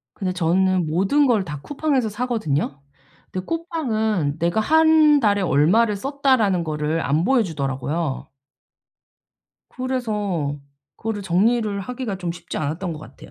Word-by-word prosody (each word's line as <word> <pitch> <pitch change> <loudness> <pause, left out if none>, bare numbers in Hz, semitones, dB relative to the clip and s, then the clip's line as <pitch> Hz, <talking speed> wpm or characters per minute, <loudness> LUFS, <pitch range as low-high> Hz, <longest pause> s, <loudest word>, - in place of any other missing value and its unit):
근데 185 -3 -2
저는 185 +1 +1
모든 195 - +2
걸 225 -6 +2
다 150 -4 -6
쿠팡에서 285 -5 0
사거든요. 210 - -2 0.5
근데 185 0 -4
쿠팡은 220 - -1
내가 170 +6 +1
1 315 +2 +5
달에 205 -4 +2
얼마를 195 +8 +3
썼다라는 260 -8 +1
거를 155 +1 -1
안 145 +6 +1
보여주더라고요. 155 - -1 1.4
그래서 210 - -2 0.4
그거를 220 -2 -4
정리를 205 +3 +1
하기가 240 -2 -5
좀 175 -2 -3
쉽지 175 - -7
않았던 160 +4 -3
것 155 - -7
같아요. 155 - -13
200 Hz, 290 characters per minute, -22 LUFS, 165-245 Hz, 1.4 s, 1